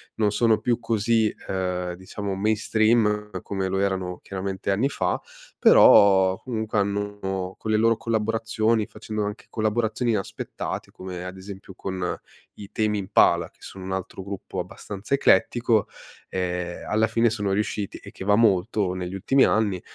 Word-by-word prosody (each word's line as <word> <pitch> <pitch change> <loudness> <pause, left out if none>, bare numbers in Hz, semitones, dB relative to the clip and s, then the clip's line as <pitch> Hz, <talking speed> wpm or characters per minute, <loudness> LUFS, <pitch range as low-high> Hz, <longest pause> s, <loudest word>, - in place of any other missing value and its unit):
non 105 -2 +1
sono 110 0 +3
più 120 -1 0
così, 110 -1 +1 0.2
uhm, 90 -1 -2
diciamo 95 +2 -5
mainstream 110 +1 +2
come 100 - -6
lo 95 +1 -1
erano 95 -2 -1
chiaramente 95 0 -4
anni 105 +8 +2
fa, - - -1 0.4
però 95 -2 +6
comunque 110 -3 -3
hanno, 100 -2 -2
con 110 - -4
le - - +3
loro 115 +1 +3
collaborazioni, 110 0 0
facendo 105 0 -5
anche 105 +2 -6
collaborazioni 110 +2 0
inaspettate, 105 -3 -4
come 90 -1 -7
ad 90 +1 -7
esempio 95 0 -10
con 95 -1 -4 0.4
i 100 0 -10
Tame 105 -1 0
Impala, 90 -4 +3
che - - -33
sono 95 - -9
un 95 - -5
altro 95 0 -5
gruppo 95 -1 -6
abbastanza 100 +5 -6
eclettico, 115 -3 +3 0.4
ehm, 90 -1 -3
alla 110 +1 +2
fine 115 +1 +2
sono 105 -3 -2
riusciti 105 0 -2
e - - -12
che - - -9
va 105 0 +4
molto 100 -2 +2
negli 90 0 -5
ultimi 130 +8 +3
anni, 100 -5 +1
105 Hz, 150 wpm, -24 LUFS, 95-110 Hz, 0.4 s, però